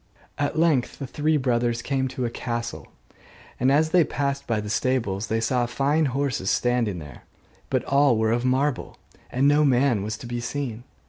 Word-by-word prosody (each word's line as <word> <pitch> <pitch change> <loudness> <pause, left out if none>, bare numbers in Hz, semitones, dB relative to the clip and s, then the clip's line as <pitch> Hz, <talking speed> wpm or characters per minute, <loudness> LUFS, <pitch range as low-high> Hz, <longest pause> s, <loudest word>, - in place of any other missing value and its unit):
At 145 +2 -1
length 155 -7 +2
the 140 - -5
three 155 +4 0
brothers 120 -3 0
came 135 -1 0
to 130 -1 -3
a 120 - -2
castle: 115 -1 -4 0.7
and 130 +2 +3
as 155 +3 +3
they 180 -1 +5
passed 140 -2 -2
by 115 -2 0
the 105 - -5
stables 110 -3 -1
they 110 +1 0
saw 120 +1 +1
fine 145 +5 +1
horses 135 -7 -1
standing 120 -6 +1
there, 75 -4 -10 0.5
but - - 0
all 140 -3 +3
were 110 0 +1
of 120 +1 0
marble, 130 +1 0 0.3
and 135 +3 +2
no 145 +1 +4
man 130 -5 +3
was 105 +2 -4
to 120 - -10
be 120 0 -4
seen. 120 -2 -4
125 Hz, 185 wpm, -24 LUFS, 115-140 Hz, 0.7 s, they